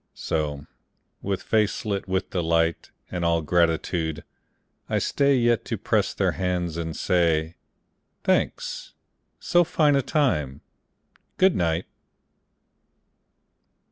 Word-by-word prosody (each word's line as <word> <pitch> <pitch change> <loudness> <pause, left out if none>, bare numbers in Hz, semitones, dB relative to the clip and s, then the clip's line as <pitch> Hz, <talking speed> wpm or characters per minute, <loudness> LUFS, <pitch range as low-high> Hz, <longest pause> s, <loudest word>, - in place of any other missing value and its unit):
So, 75 -3 -3 0.6
with 100 -1 -3
face 110 0 0
lit 100 -2 -2
with 95 0 -2
delight 85 -2 0 0.2
And 90 -1 -3
all 85 -1 +2
gratitude, 80 0 0 0.7
I - - +1
stay 140 0 +2
Yet 120 -2 +2
to - - -3
press - - 0
their - - +1
hands 90 -3 -2
and 80 -1 -4
say, 85 -2 +1 0.7
"Thanks. - - -1 0.4
So 175 0 +3
fine 150 -3 +2
a 140 - +3
time! 75 - 0 0.8
Good 190 -1 +4
night. 85 0 0
85 Hz, 110 wpm, -25 LUFS, 80-105 Hz, 0.8 s, Good